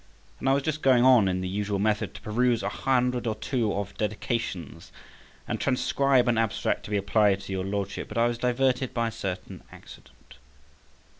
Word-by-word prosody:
And 135 Hz, -, 0 dB
I -, -, +5 dB
was 140 Hz, 0 st, +1 dB
just 155 Hz, 0 st, -2 dB
going 130 Hz, -2 st, +4 dB
on 125 Hz, -6 st, +6 dB
in 90 Hz, 0 st, -1 dB
the 95 Hz, -, -3 dB
usual 100 Hz, +1 st, -2 dB
method 105 Hz, +1 st, 0 dB
to -, -, -10 dB
peruse 120 Hz, +1 st, +1 dB
a 100 Hz, -, -1 dB
hundred 125 Hz, +1 st, 0 dB
or 110 Hz, -, -1 dB
two 115 Hz, -1 st, -1 dB
of 100 Hz, 0 st, -4 dB
dedications, 105 Hz, -, -3 dB, 0.6 s
and -, -, -3 dB
transcribe 135 Hz, -1 st, +2 dB
an 115 Hz, -2 st, +2 dB
abstract 115 Hz, -2 st, -1 dB
to -, -, -8 dB
be 105 Hz, -, 0 dB
applied 100 Hz, 0 st, +2 dB
to 95 Hz, -, -8 dB
your 95 Hz, -1 st, -2 dB
Lordship, 100 Hz, 0 st, -3 dB
but 105 Hz, -, -7 dB
I 115 Hz, -, +4 dB
was 120 Hz, 0 st, -1 dB
diverted 125 Hz, +1 st, 0 dB
by 115 Hz, -1 st, +1 dB
a -, -, -9 dB
certain 100 Hz, -5 st, -6 dB
accident. -, -, -16 dB
115 Hz, 195 wpm, -26 LUFS, 100-125 Hz, 0.6 s, on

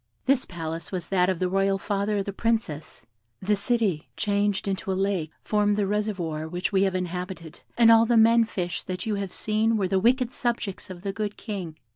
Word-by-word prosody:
This 265 Hz, 0 st, +3 dB
palace 165 Hz, -1 st, -6 dB
was 180 Hz, -3 st, -4 dB
that 185 Hz, -1 st, +3 dB
of 185 Hz, -, 0 dB
the 185 Hz, -, 0 dB
royal 195 Hz, +1 st, +2 dB
father 200 Hz, +1 st, -1 dB
of 195 Hz, -, -1 dB
the 200 Hz, -, -4 dB
Princess: 200 Hz, -, -2 dB, 0.3 s
the 210 Hz, +2 st, +1 dB
city, 200 Hz, -7 st, 0 dB
changed 205 Hz, -1 st, 0 dB
into 195 Hz, 0 st, -2 dB
a 185 Hz, -, -1 dB
lake, 190 Hz, -5 st, 0 dB
formed 210 Hz, -1 st, +2 dB
the 205 Hz, -, +2 dB
reservoir 190 Hz, -7 st, -2 dB
which 180 Hz, +5 st, -2 dB
we 190 Hz, -1 st, +3 dB
have 190 Hz, -1 st, +2 dB
inhabited, 180 Hz, -2 st, -5 dB, 0.2 s
and 230 Hz, -1 st, +7 dB
all 225 Hz, 0 st, +6 dB
the 240 Hz, 0 st, +4 dB
men 230 Hz, +1 st, +6 dB
fish 175 Hz, -6 st, -3 dB
that 180 Hz, -1 st, -5 dB
you 220 Hz, -, -1 dB
have 195 Hz, -2 st, -4 dB
seen 220 Hz, +1 st, +1 dB
were 195 Hz, -3 st, +1 dB
the 190 Hz, +1 st, +2 dB
wicked 245 Hz, +4 st, +2 dB
subjects 230 Hz, -6 st, -2 dB
of 180 Hz, -1 st, -9 dB
that 195 Hz, -1 st, -2 dB
good 210 Hz, 0 st, -3 dB
King. 185 Hz, -8 st, -6 dB
195 Hz, 205 wpm, -26 LUFS, 180-215 Hz, 0.3 s, and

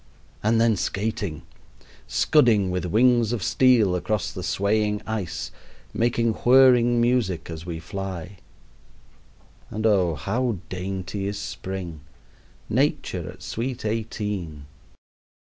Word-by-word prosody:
And 110 Hz, +2 st, +2 dB
then 115 Hz, -2 st, +3 dB
skating! 100 Hz, -5 st, -3 dB, 0.6 s
scudding 110 Hz, -10 st, +3 dB
with 90 Hz, 0 st, -2 dB
wings 115 Hz, +4 st, +3 dB
of 110 Hz, -6 st, -2 dB
steel 120 Hz, -8 st, +4 dB
across 105 Hz, +2 st, -1 dB
the -, -, -6 dB
swaying 105 Hz, +1 st, 0 dB
ice, 110 Hz, -6 st, -4 dB, 0.4 s
making 115 Hz, -1 st, +1 dB
whirring 120 Hz, -1 st, +5 dB
music 120 Hz, -9 st, 0 dB
as 80 Hz, +1 st, -8 dB
we 85 Hz, -2 st, -4 dB
fly. 95 Hz, +1 st, -6 dB, 1.3 s
And 110 Hz, +1 st, -4 dB
oh, 95 Hz, -7 st, +3 dB
how 115 Hz, +5 st, -1 dB
dainty 95 Hz, +2 st, -4 dB
is 100 Hz, 0 st, -3 dB
spring 95 Hz, -5 st, -6 dB, 0.7 s
Nature -, -, 0 dB
at -, -, -15 dB
sweet 120 Hz, +1 st, -4 dB
eighteen! 105 Hz, -8 st, -3 dB
105 Hz, 110 wpm, -24 LUFS, 95-115 Hz, 1.3 s, whirring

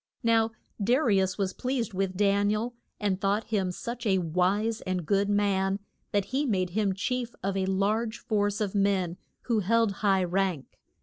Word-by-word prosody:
Now 225 Hz, -1 st, +3 dB, 0.3 s
Da 240 Hz, +5 st, +4 dB
ri 220 Hz, -10 st, +3 dB
us 190 Hz, -1 st, -1 dB
was 195 Hz, -2 st, -1 dB
pleased 250 Hz, -4 st, -2 dB
with 190 Hz, -1 st, -1 dB
Dan 200 Hz, 0 st, +3 dB
i -, -, +2 dB
el, 235 Hz, +3 st, -3 dB, 0.3 s
and 200 Hz, -3 st, 0 dB
thought 205 Hz, +2 st, +1 dB
him 195 Hz, -3 st, +1 dB
such 235 Hz, +5 st, -5 dB
a 190 Hz, -2 st, +3 dB
wise 185 Hz, +6 st, +1 dB
and 185 Hz, -3 st, -2 dB
good 200 Hz, +4 st, +2 dB
man 195 Hz, -1 st, +2 dB, 0.3 s
that 200 Hz, -2 st, +1 dB
he 270 Hz, +3 st, -1 dB
made 185 Hz, -5 st, 0 dB
him 200 Hz, -1 st, 0 dB
chief 245 Hz, +4 st, -2 dB
of 195 Hz, 0 st, -1 dB
a 190 Hz, -1 st, 0 dB
large 215 Hz, +4 st, 0 dB
force 205 Hz, -2 st, 0 dB
of 205 Hz, -3 st, -1 dB
men 195 Hz, -4 st, +1 dB, 0.3 s
who 230 Hz, -3 st, +1 dB
held 225 Hz, +2 st, +2 dB
high 195 Hz, -3 st, +3 dB
rank. 180 Hz, -5 st, -1 dB
200 Hz, 185 wpm, -28 LUFS, 190-220 Hz, 0.3 s, Da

